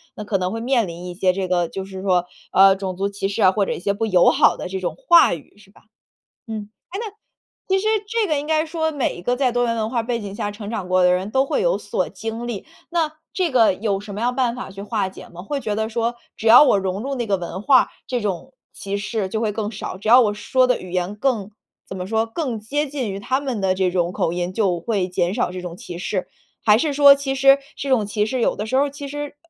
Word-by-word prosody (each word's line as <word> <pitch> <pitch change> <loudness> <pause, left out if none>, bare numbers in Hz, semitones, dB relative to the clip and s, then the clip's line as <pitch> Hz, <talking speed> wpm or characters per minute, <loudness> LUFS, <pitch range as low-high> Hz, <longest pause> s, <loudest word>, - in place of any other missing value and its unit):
那 210 - -6
可 205 -1 0
能 185 0 -2
会 225 0 -4
面 240 -4 +1
临 170 +1 -8
一 175 - -7
些 185 -1 +2
这 190 0 -2
个 175 -2 +1
就 190 +2 -6
是 190 0 -8
说， 180 -2 +2 0.3
呃， 195 0 +6
种 190 -2 -4
族 200 +2 -1
歧 200 -1 -3
视 200 +3 -3
啊， 190 -2 +6
或 200 0 +1
者 - - -3
一 - - -3
些 200 - 0
不 225 +3 -1
友 185 -5 +5
好 - - +4
的 - - -6
这 190 +1 -4
种 180 - -3
话 345 - +5
语， 165 +4 -10
是 195 -1 -20
吧？ - - -21 0.7
嗯， 215 -2 -6 0.2
诶， 395 - -3
那 440 -3 -5 0.6
其 385 0 +2
实 430 - -2 0.2
这 450 -1 0
个 305 -2 +1
应 290 - -5
该 310 0 +2
说 320 0 -1
每 285 -4 -1
一 175 - -9
个 245 - +1
在 255 -1 +1
多 245 0 +1
元 230 - 0
文 220 -1 -1
化 235 -2 -1
背 235 0 -2
景 200 -2 -7
下 205 0 -3
成 205 0 -8
长 195 -5 -4
过 185 0 +3
的 180 - +5
人 185 +3 -1
都 265 +2 +2
会 - - 0
有 - - +2
所 - - -2
经 225 +1 -6
历， 225 -5 -5 0.3
那 330 -3 +1 0.2
这 365 -3 0
个 235 -7 +4
有 200 0 -1
什 205 0 -9
么 210 - -5
样 245 +1 0
办 245 -2 +1
法 250 - -7
去 195 +1 -9
化 210 -3 -1
解 - - -12
吗？ 175 0 -10
会 275 +9 -3
觉 215 -5 -3
得 220 +1 -1
说， 230 +1 -1 0.2
只 225 - -8
要 230 +4 +9
我 210 - +4
融 190 +1 -2
入 275 +2 -3
那 240 -2 -2
个 200 -2 +1
文 180 +1 -6
化， 265 -3 +5 0.2
这 245 -3 -2
种 205 +6 -4 0.2
歧 200 0 -4
视 205 -1 -2
就 220 +3 -3
会 215 -2 0
更 210 +1 -3
少？ 195 -2 -6
只 205 +3 -7
要 245 +3 +8
我 210 -3 +2
说 255 +5 +2
的 250 - +1
语 185 - -10
言 180 +3 -2
更 215 -4 -1 0.4
怎 190 - -7
么 180 - -4
说， 220 +3 0
更 245 -3 -3
接 290 +7 -2
近 265 -6 -3
于 195 - -5
他 260 +6 0
们 260 -6 -3
的 190 -1 +1
这 185 -1 +1
种 175 -1 0
口 165 - 0
音， 175 +1 -3
就 190 -4 +1
会 190 0 -1
减 180 +1 0
少 235 -6 0
这 185 - -6
种 175 -1 -7
歧 175 -1 -8
视？ 185 +1 -3 0.4
还 210 -1 +6
是 295 +3 0
说 280 0 +8
其 275 -1 -3
实， 275 +1 +6 0.2
这 275 - -5
种 235 -5 +3
歧 210 +1 -1
视 255 +1 -2
有 - - +2
的 210 - -4
时 260 - -1
候 280 - +4
儿 285 - -3
其 285 0 -7
实 290 +1 -6
215 Hz, 295 characters per minute, -21 LUFS, 190-255 Hz, 0.7 s, 要